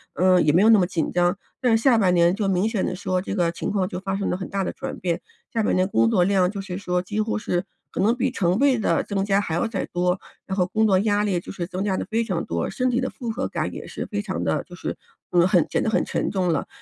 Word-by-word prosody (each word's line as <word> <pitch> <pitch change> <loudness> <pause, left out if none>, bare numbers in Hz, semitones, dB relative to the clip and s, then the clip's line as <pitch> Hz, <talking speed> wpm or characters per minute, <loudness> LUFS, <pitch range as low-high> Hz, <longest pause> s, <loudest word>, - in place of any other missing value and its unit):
嗯， 185 -1 +4
也 150 - +5
没 170 +5 +4
有 215 - +5
那 225 - +8
么 185 - +3
紧 170 -3 -1
张。 175 +1 +1 0.2
但 245 -3 +4
是 - - -5
下 245 -1 +5
半 190 -5 +3
年 175 +1 +4
就 200 -2 -1
明 190 +3 +2
显 225 -4 -1
地 - - -2
说， 185 -1 -1
这 - - -5
个 175 -4 +1
情 - - -3
况 195 -3 0
就 200 - -5
发 195 0 -2
生 200 - -2
了 - - 0
很 185 - -6
大 195 0 -1
的 - - -3
转 - - -6
变， 175 -2 -1 0.3
下 225 - +1
半 - - +1
年 185 0 +2
工 115 - +3
作 175 +8 +3
量 190 -1 +2
就 200 - -6
是 190 -2 -5
说 180 -2 -1
几 210 +4 -2
乎 220 - -1
是 180 -4 -1 0.3
可 - - -2
能 215 +4 +4
比 260 +1 0
成 185 -5 0
倍 275 -2 +4
地 220 - +1
增 195 -2 -2
加 200 0 +2
还 175 -6 -2
要 170 - +1
再 225 -4 -2
多， 180 +1 0 0.3
然 190 - -4
后 180 -1 +2
工 220 +3 +1
作 190 -3 +4
压 205 0 +2
力 195 -4 0
就 - - -12
是 175 - -4
增 185 +1 -5
加 195 - +1
得 - - -2
非 230 +1 -1
常 185 -6 -2
多， 85 0 -2
身 255 0 0
体 245 0 +1
的 260 - -1
负 235 -2 -5
荷 220 - -2
感 - - -3
也 - - -7
是 - - -5
非 205 -2 -3
常 200 -2 -3
的 - - 0
就 180 - -12
是， - - -4 0.4
嗯， 175 0 +4
很 180 -4 +3
显 - - +1
得 - - 0
很 220 - +2
沉 - - -1
重 185 -3 0
了。 150 - -2
190 Hz, 320 characters per minute, -23 LUFS, 180-215 Hz, 0.4 s, 那